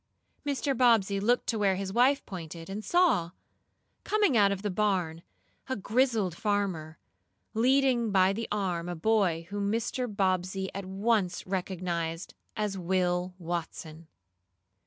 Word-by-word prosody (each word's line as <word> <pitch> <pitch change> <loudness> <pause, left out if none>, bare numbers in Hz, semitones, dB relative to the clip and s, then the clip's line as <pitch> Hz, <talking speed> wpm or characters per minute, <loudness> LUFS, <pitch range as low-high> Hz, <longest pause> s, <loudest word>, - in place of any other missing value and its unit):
Mr. 280 -1 -1
Bobbsey 225 -5 +3
looked 240 +5 +2
to 225 - -1
where 195 -2 +3
his 190 0 -4
wife 260 +5 +3
pointed, 170 -2 -8
and 210 +2 -5
saw, 345 - +3 0.7
coming 415 - +2
out 200 -3 +5
of 200 0 -3
the 205 - -1
barn, 180 -5 0 0.5
a 260 - 0
grizzled 220 -3 +1
farmer, 185 -7 -2 0.6
leading 250 0 +3
by 190 0 +4
the 225 +3 -4
arm 180 -4 -1
a 175 - -3
boy 175 -3 +1
whom 200 0 -1
Mr. 235 +3 -1
Bobbsey 190 -1 -1
at 195 0 -5
once 195 -1 0
recognized 180 -3 -3 0.2
as 210 -2 -2
Will 180 0 0
Watson. 165 -2 -5
195 Hz, 135 wpm, -29 LUFS, 180-225 Hz, 0.7 s, out